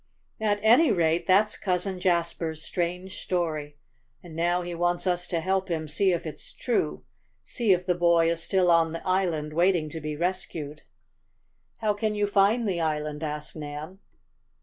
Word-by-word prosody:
"At 210 -1 +1
any 240 +6 +6
rate 165 -2 +1
that's 205 +3 +4
Cousin 185 0 -1
Jasper's 170 -3 0
strange 180 +2 -3
story. 155 -5 -2 0.5
And 170 -3 -11
now 175 +2 +1
he 175 0 -5
wants 175 +1 0
us 175 -1 0
to 170 -2 -1
help 190 +1 0
him 160 -2 -2
see 190 +6 +2
if 170 0 -2
it's 155 - -8
true 75 0 -1 0.4
see 230 -4 0
if 180 -1 +2
the 180 - +2
boy 170 -1 +3
is 165 0 -2
still 180 0 +2
on 165 -1 +3
the 165 - -6
island 170 -5 0
waiting 170 -2 +2
to 160 - -6
be 150 0 -4
rescued." 155 -3 -3 1.0
"How 215 -2 +2
can 210 +1 -2
you 205 0 +1
find 205 +3 +2
the 180 -3 -1
island?" 150 -1 -2
asked 150 -1 -5
Nan. 155 +4 -7
175 Hz, 170 wpm, -26 LUFS, 160-190 Hz, 1.0 s, any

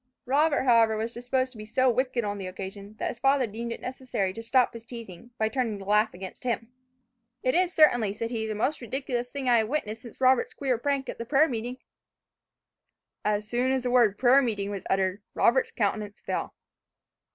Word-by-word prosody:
Robert, 285 +2 +2
however, 230 -3 +4
was 225 +2 -3
disposed 255 +2 -1
to 230 - -13
be - - -6
so 260 +3 +2
wicked 250 0 +1
on 205 -1 -3
the 190 - -5
occasion, 195 +2 -8
that - - -2
his - - -7
father 270 -1 +3
deemed 230 +2 -5
it - - -5
necessary 250 -7 -3
to 225 - -7
stop 250 +2 +2
his 230 -1 -9
teasing, 230 -4 -10
by 220 - +1
turning 230 -3 -1
the 195 - -9
laugh 210 +2 +3
against 185 +5 -9
him. 235 -1 -2 0.7
"It 255 - +2
is 365 0 +2
certainly," 245 - +4
said 230 +3 -4
he, 220 -2 -2
"the 215 - -3
most 265 +8 -1
ridiculous 245 0 -3
thing 275 0 -4
I 240 -2 +5
have 220 - 0
witnessed 225 -5 -3
since 235 - -12
Robert's 265 - +3
queer 260 - 0
prank 275 0 -1
at - - -6
the 230 - -4
prayer 295 +5 +4
meeting." 245 0 -4 1.5
As 210 0 0
soon 245 +3 +1
as 265 -1 0
the 250 - -1
word 235 -5 +4
"prayer 260 +2 +6
meeting" 205 -5 -2
was 200 -2 -6
uttered, 190 +1 +1
Robert's 470 -2 +3
countenance 210 - -2
fell. - - -4
235 Hz, 205 wpm, -27 LUFS, 215-260 Hz, 1.5 s, prayer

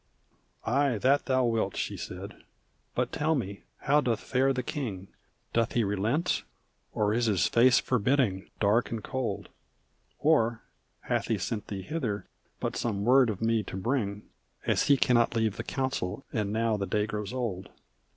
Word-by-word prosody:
"Ay! 135 0 +2
That 135 +6 +2
thou 130 -1 +3
wilt," 115 -2 0
she - - -2
said. - - -7 0.5
"But - - 0
tell 155 +2 +1
me, 100 -7 -4 0.2
how 145 +2 +4
doth 115 -5 0
fare 135 +1 +1
the 125 -1 -1
king? 105 - -4 0.4
Doth 115 -1 +1
he 120 - +2
relent? 105 - 0 0.5
Or 105 0 +1
is 120 +1 +1
his 95 -6 +2
face 125 +2 +5
forbidding 125 -5 +1
dark 110 +3 +3
and 115 -2 -4
cold? 125 -7 -3 0.7
Or 120 -7 +2 0.4
hath - - -1
he 110 - +1
sent 105 +3 -3
thee 95 -2 -5
hither 125 - -3 0.3
but - - -2
some 105 -4 -1
word 130 0 +6
of 105 0 -3
me 115 -1 +2
to 95 - -7
bring 105 -2 -1 0.4
As - - +2
he 140 - +6
cannot 120 -2 +3
leave 110 -3 +1
the - - -3
council, 130 -5 -2
and 105 -4 -1
now 110 0 +1
the 100 -1 -2
day 105 -1 +1
grows 105 -1 -4
old?" 110 -7 -3
115 Hz, 165 wpm, -29 LUFS, 105-130 Hz, 0.7 s, word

